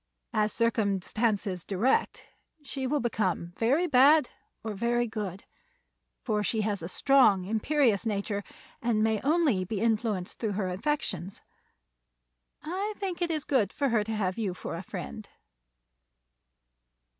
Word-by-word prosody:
As 215 -1 +2
circumstances 210 -3 0
direct 210 +7 0 0.4
she 270 -2 -4
will 295 +3 +1
become 190 -7 -1
very 275 +10 +2
bad 290 0 +5 0.3
or 220 -1 -3
very 235 +3 +1
good, 205 -4 -5 0.8
for 210 -4 0
she 220 +2 0
has 205 -3 -1
a 165 - -4
strong, 210 -3 +4
imperious 225 +1 +2
nature 205 -2 -2 0.4
and 230 -3 +1
may 220 -1 +1
only 290 - +2
be 200 +2 -3
influenced 215 -4 -1
through 215 -3 -1
her 190 -2 -1
affections. 190 - -3 1.2
I 390 +6 -3
think 375 -3 -4
it 345 - +1
is 310 -3 -1
good 255 -8 +1
for 280 -1 0
her 225 -3 +2
to 220 +1 -4
have 190 -1 -1
you 195 -5 -1
for 165 - -6
a 170 - -5
friend." 195 +3 -7
220 Hz, 135 wpm, -28 LUFS, 200-265 Hz, 1.2 s, bad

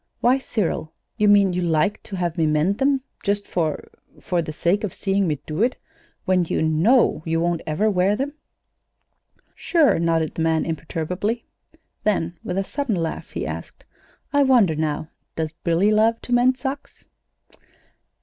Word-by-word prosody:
"Why, 255 +3 +3
Cyril, 185 -10 -2 0.2
you 210 -2 +2
mean 200 -2 +5
you 180 - -1
like 165 +3 +1
to 200 - -7
have 175 -3 -2
me 165 -3 +1
mend 155 +7 +1
them 270 -1 +2 0.2
just 200 -1 -1
for 160 -4 -2 0.3
for 175 -2 -1
the 155 - -5
sake 175 +7 0
of 205 - -3
seeing 195 -1 0
me 150 -3 -1
do 155 +5 -3
it, 245 +3 +2 0.5
when 185 -1 +3
you 160 - -1
know 165 +12 +3
you 165 0 0
won't 170 0 0
ever 160 +8 +1
wear 195 0 +2
them?" 275 +5 -3 1.2
"Sure!" 310 - +2
nodded 165 -2 +1
the - - -4
man, 160 0 +1
imperturbably. 170 +7 -3 0.6
Then, 175 -5 0
with 180 - -3
a 195 - +1
sudden 275 0 -2
laugh, 165 -2 -3
he - - -4
asked: - - -7 0.5
"I 285 - +4
wonder 245 - +4
now, 155 0 -2 0.3
does 160 -1 -3
Billy 175 +5 +3
love 220 +2 +3
to 245 - -3
mend 250 +1 +4
socks?" 270 +2 -6
185 Hz, 165 wpm, -22 LUFS, 165-220 Hz, 1.2 s, mean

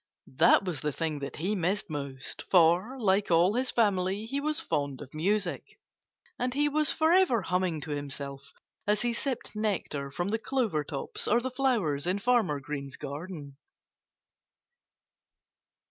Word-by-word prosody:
That 195 - +5
was 175 -6 -2
the 150 - 0
thing 155 0 -2
that 140 - -5
he 185 +7 -1
missed 195 +2 0
most; 140 -3 -5
for, 180 +8 +4
like 200 -2 +2
all 175 +3 +4
his 250 +2 0
family, 200 -2 +1
he 275 +5 -2
was 305 +1 -1
fond 145 - -2
of 140 -2 -10
music. 200 +7 -1 0.6
And 250 0 -1
he 295 +1 +3
was 300 +1 +2
forever 320 - +3
humming 180 -3 0
to 150 - -6
himself 140 -1 -5 0.4
as 210 +2 +2
he 240 -1 +1
sipped 250 -2 -3
nectar 190 -10 -2
from 175 +7 -2
the 225 +2 0
clover 225 - 0
tops 140 -1 -3
or 235 - +4
the 255 +2 -3
flowers 215 - +1
in 185 +2 +1
Farmer 205 -9 +2
Green's 140 -1 -6
garden. 145 -2 -7
185 Hz, 150 wpm, -29 LUFS, 150-235 Hz, 0.6 s, That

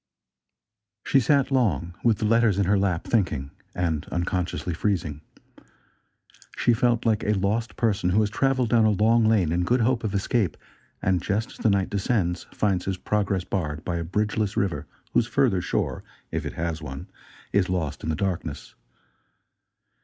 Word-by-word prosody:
She 135 - +4
sat 140 +2 +2
long, 90 - +1
with 115 -3 +3
the 110 - -2
letters 115 -2 +3
in 100 - +2
her 100 +3 +3
lap, 95 -4 0
thinking 75 - 0 0.2
and 80 -4 -1
unconsciously 90 0 -2
freezing. 85 -5 -1 1.4
She 120 - +3
felt 120 0 +1
like 110 -2 +2
a 105 - +2
lost 105 +5 -1
person 100 -5 +1
who 95 +4 +3
has 105 -1 0
traveled 130 0 +1
down 115 -2 +4
a - - +5
long 110 +3 +3
lane 105 -8 +3
in 90 +1 +1
good 120 +7 +2
hope 120 +1 +1
of 105 -2 -2
escape, 100 -2 0 0.5
and, 90 -2 +2
just 105 +5 -1
as - - -13
the 110 - +2
night 100 -2 +1
descends 95 -4 0
finds 95 -4 0
his 95 -1 -2
progress 100 -2 0
barred 75 -6 -3
by 85 -1 -1
a 85 - -2
bridge 105 +6 -1
less 105 -2 -1
river 95 -4 -1 0.3
whose 120 - +3
further 120 -10 +2
shore, - - -2 0.3
if - - -2
it - - -6
has 80 -1 -3
one, 70 -2 -7 0.5
is 95 -3 +2
lost 85 -6 -2
in - - -4
the 80 - 0
darkness. 90 -5 -3
100 Hz, 175 wpm, -25 LUFS, 90-110 Hz, 1.4 s, a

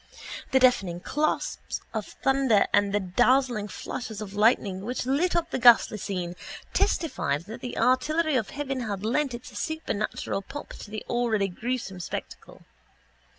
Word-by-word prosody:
The 265 - +3
deafening 195 -9 +3
claps 300 +11 -1 0.3
of 215 -3 -3 0.2
thunder 270 -6 +4
and 205 -1 +4
the 205 - +2
dazzling 240 +3 +2
flashes 220 +1 -6
of 205 -2 -7
lightning 205 -3 +2
which 245 +3 -3
lit 290 +8 +1
up 340 0 0
the - - -1
ghastly 235 -3 +6
scene 180 -3 -3 0.4
testified 170 - 0
that 220 +3 -8
the 245 - -5
artillery 290 +6 +2
of 225 -5 0
heaven 275 -2 -3
had 210 -4 -3
lent 260 +2 +1
its 245 -1 -10
supernatural 215 -7 -2
pomp 290 +9 -8
to - - -9
the 215 0 -6
already 225 -5 +1
gruesome 220 -1 -4
spectacle. 175 - -7
235 Hz, 150 wpm, -27 LUFS, 200-265 Hz, 0.4 s, ghastly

